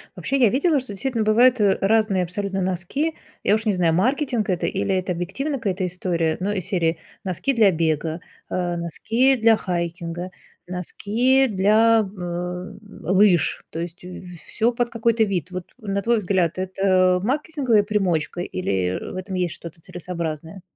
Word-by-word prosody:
Вообще, 275 - -1
я 245 -5 +5
видела, 285 - +2
что 255 -5 -8
действительно 230 +2 -1
бывают, 240 +3 +5
э, 200 -2 +4
разные 205 -2 +2
абсолютно 195 +2 -3
носки. 190 - -1 0.3
Я 205 - +4
уж 220 +1 -3
не 210 - +2
знаю, 175 -3 +2
маркетинг 240 - +1
это 180 -2 0
или 190 - 0
это 185 0 -1
объективно 195 - -3
какая-то 195 -5 -2
история, 170 -3 -1
ну, 195 +3 -1
из 190 -4 -3
серии: 165 -3 0 0.3
носки 190 - -1
для 220 -5 +5
бега, 160 0 -1 0.3
а, 175 -1 -1
носки 225 - +1
для 225 -2 +4
хайкинга, 175 -1 -4 0.4
носки 225 +9 +1
для, 215 +3 +4
э, 195 - -8 0.9
лыж. 190 -1 +3
То 165 - -6
есть 170 +1 -6
в 180 0 -9
всё 230 +7 0
под 240 0 -1
какой-то 230 -1 +2
вид. 185 -3 -3
Вот, 185 -1 -5
на 200 -4 -2
твой 235 +2 +2
взгляд, 185 -5 0
это 185 -1 +2
маркетинговая 265 - +1
примочка 185 -6 -1
или, 95 - -1
э, - - -7
в - - -8
этом 185 +1 -5
есть 180 -2 -1
что-то 165 0 -11
целесообразное? 170 0 -6
190 Hz, 160 wpm, -23 LUFS, 175-225 Hz, 0.9 s, я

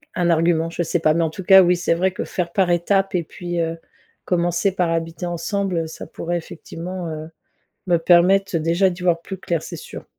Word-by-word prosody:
un 175 -1 +1
argument, 165 0 +2
je 170 +1 -2
sais 170 +1 -1
pas. 155 -1 +3
Mais, 170 - +2
en 160 - 0
tout 190 - -8
cas, 190 +1 +8
oui, 180 0 +3
c'est 175 - +1
vrai 185 +2 +1
que - - -5
faire 175 -2 -3
par 190 -3 +2
étape 195 +3 +1
et 175 - +1
puis, 175 +1 -4
heu, 165 0 -2 0.5
commencer 175 +2 +1
par 180 -3 0
habiter 165 +1 -3
ensemble, 180 +2 -2
heu, 160 - -3
ça 160 - -9
pourrait 175 +1 -3
effectivement, 175 +2 -7
heu, 155 0 -6 0.6
me 175 - +4
permettre, 180 +2 +4
déjà, 170 +4 +2
d'y 180 0 -7
voir 170 -2 +2
plus 190 +2 -7
clair 170 -3 -2
c'est - - -7
sûr. - - -10
175 Hz, 220 wpm, -21 LUFS, 165-185 Hz, 0.6 s, cas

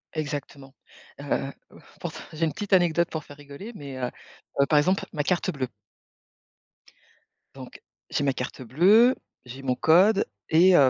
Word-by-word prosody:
Exactement. 145 -2 -5 0.4
Heu, 140 -1 -2 0.5
pourtant, - - -6
j'ai 160 +1 0
une 155 - -2
petite 205 +4 -4
anecdote 170 -2 +3
pour 160 -2 -4
faire 145 - -13
rigoler 145 +9 -10
mais, 140 -7 -8
heu, 125 -1 -2 0.5
heu, - - +5
par 150 - +4
exemple, 185 +6 +2
ma 150 - -1
carte 175 +3 0
bleue 135 -3 -3 1.9
donc, - - -11 0.3
j'ai - - -1
ma 140 -1 +2
carte 125 0 -5
bleue, 195 - +5 0.3
j'ai 125 +2 -9
mon 130 -2 0
code 190 - +5 0.2
et 175 +3 +6
heu, 135 -5 +7
150 Hz, 155 wpm, -26 LUFS, 140-180 Hz, 1.9 s, heu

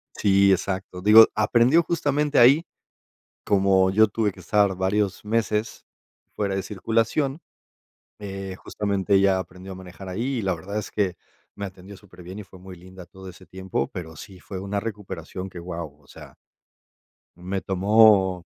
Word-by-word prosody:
Si, 100 -1 +3
exacto, 95 -1 -2
digo, 110 +3 +9
aprendió 120 +9 +3
justamente 150 -3 -1
ahí. 135 +8 +6 0.8
Como 95 -1 +3
yo 110 +3 +5
tuve 105 -1 -1
que - - -15
estar 100 -2 +2
varios 95 +2 -1
meses 110 0 -2 0.5
fuera 100 -2 -1
de 95 - -2
circulación, 115 - -1 0.8
eh, 95 -2 -7
justamente, 100 -1 -2
ella 95 -1 +4
aprendió 95 +1 -8
a - - -7
manejar 95 +1 -11
ahí. 120 +8 -3
Y 110 - -3
la 95 -2 0
verdad 100 +5 -6
es 105 - -6
que, 95 -4 -1 0.4
me 100 - -6
atendió 95 +1 -12
superbien, 90 -1 -12
y 105 - -8
fue 95 -1 -16
muy 95 0 -11
linda 95 +1 -13
todo 95 +2 -13
ese 95 +1 -13
tiempo, 95 -7 -4
pero 80 -3 -8
sí 95 +3 -12
fue 95 +1 -8
una 100 +1 -3
recuperación 100 -3 -7
que, 90 - -10
wao, 85 -4 -7
o 70 - -26
sea - - -14 1.0
me 95 +2 -4
tomó, 95 -2 +3
95 Hz, 160 wpm, -24 LUFS, 95-105 Hz, 1.0 s, digo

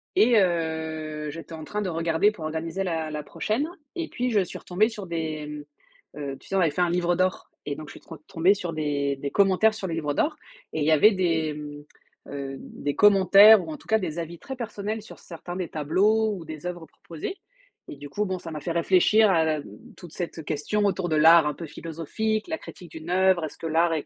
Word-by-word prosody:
et 230 -1 +5
heu, 160 -3 -2
j'étais 165 +1 -9
en 160 -1 -7
train 210 +6 -4
de 190 - -2
regarder 165 +4 +2
pour 170 -7 -10
organiser 165 +4 -3
la 160 -4 -2
la 150 -1 -5
prochaine, 220 - -2 0.3
et 335 -1 -3
puis 250 -3 -2
je 210 -3 +3
suis 180 - -6
retombée 195 +5 +1
sur 210 -4 -8
des, 160 -3 -3 0.7
mmh, - - -9
heu, 140 -2 -5
tu - - -20
sais 195 - -3
on - - +3
avait 165 - +4
fait 150 +5 -2
un 175 - +3
livre 175 0 +1
d'or 185 0 -1 0.2
et 145 -1 -3
donc 155 - -9
je - - -10
suis - - -12
tro 165 - -11
tombée 175 +4 +3
sur 175 -4 -5
des 145 -2 -1
des 140 +1 -4
commentaires 200 +2 +4
sur 200 -3 -5
le 165 - -3
livre 150 -3 -2
d'or 300 - 0 0.4
et - - -2
il - - +1
y 160 - +3
avait 210 +8 +6
des, 165 -5 0
mmh, 145 -1 -8 0.5
heu, 140 -1 -5
des 145 -1 -5
commentaires 200 0 +7
ou - - -5
en 155 - -6
tout - - -20
cas 220 - +4
des 170 -4 -4
avis 170 +1 -6
très 265 - -7
personnels 220 -2 -4
sur 215 - -13
certains 175 +1 -8
des 180 -3 -3
tableaux 210 +8 +2
ou 170 -4 -9
des 155 +2 -7
oeuvres 175 -2 -6
proposées, 165 - -8 0.5
et - - -7
du 145 0 -9
coup, 210 +7 -1
bon, 185 -1 -2
ça 165 - -8
m'a 155 -1 -6
fait 170 - -3
réfléchir 190 +5 +4
à 165 -3 +3
la 160 -1 +1
m 145 - -6 0.3
toute 175 -3 -12
cette 165 -3 -5
question 165 +8 -1
autour 190 -3 0
de 155 - +1
l'art 160 0 +7
un 150 - -1
peu 165 - -7
philosophique, 170 - -3
la 320 - -2
critique 175 -5 -12
d'une 160 +1 -9
oeuvre, 185 -1 +3
est-ce 150 - -9
que - - -8
l'art 165 +1 +2
est 155 -3 -2
170 Hz, 240 wpm, -25 LUFS, 155-195 Hz, 0.7 s, commentaires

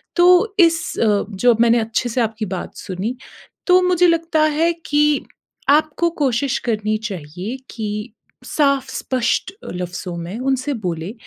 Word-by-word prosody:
तो 360 +4 +5
इस 330 -1 +5 0.2
अ, 210 -3 +2
जो 235 +5 +3
मैंने 235 0 +5
अब 220 - -1
अच्छे 240 +2 -1
से 245 +2 0
आपकी 220 -1 -2
बात 180 - -7
सुनी, 195 +6 -4 0.5
तो 365 0 +6
मुझे 360 -1 +3
लगता 330 -2 +2 0.2
है 335 +1 +4
कि 295 0 +2 0.4
आपको 310 +3 +3
कोशिश 260 +1 +1
करनी 215 -1 0
चाहिए 180 - -6
कि 210 -1 -5 0.3
साफ़, 275 -3 +1
स्पष्ट 255 +8 -1 0.2
लफ़्ज़ों 180 0 -5
में 190 +7 -6
उनसे 265 +2 -1
बोलें 170 +3 -3
245 Hz, 145 wpm, -20 LUFS, 210-310 Hz, 0.5 s, तो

